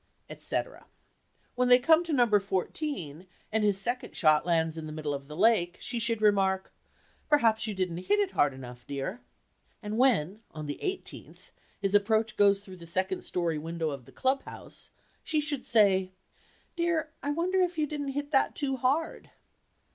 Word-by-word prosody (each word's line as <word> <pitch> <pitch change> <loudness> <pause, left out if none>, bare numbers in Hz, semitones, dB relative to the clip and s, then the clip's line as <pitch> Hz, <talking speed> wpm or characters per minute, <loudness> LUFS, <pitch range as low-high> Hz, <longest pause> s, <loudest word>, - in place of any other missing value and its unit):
et - - -10
cetera. - - -4 0.7
When 250 0 +1
they 245 0 +8
come 320 +6 +4
to 335 - -4
number 240 -7 +4
fourteen, 190 - -4 0.2
and 220 0 +1
his 205 -2 +2
second 245 +4 -3
shot 155 0 +3
lands 160 -2 +1
in 160 -1 -6
the - - -7
middle 155 -1 -3
of 140 -1 -6
the 150 +1 -9
lake, 190 -4 +3
she 240 -2 -3
should 230 -1 -1
remark, 195 -2 +2 0.6
"Perhaps 230 -6 +3
you 210 - -3
didn't 185 -3 -2
hit 410 - +1
it 400 -2 +1
hard 145 - +3
enough, 125 -2 -11
dear." 140 - -4 0.6
And 215 +1 -4
when, 215 - +2
on 155 -1 -7
the 145 - -6
eighteenth, 380 0 -6 0.3
his 195 -1 -1
approach 220 +2 +2
goes 200 -1 +4
through 190 -2 -12
the 170 -1 -12
second 185 +2 -1
story 170 -3 -1
window 165 0 -3
of 135 -4 -7
the - - -16
club 270 +1 0
house, - - -11 0.3
she 310 - 0
should 295 -3 -4
say, 190 -4 +3 0.6
"Dear, 335 -3 0
I 285 - -3
wonder 350 +5 0
if 360 -2 +1
you 305 - +2
didn't 285 -2 -4
hit 290 0 -3
that 270 - +2
too 270 -2 -1
hard?" 275 +6 -1
210 Hz, 180 wpm, -29 LUFS, 170-275 Hz, 0.7 s, they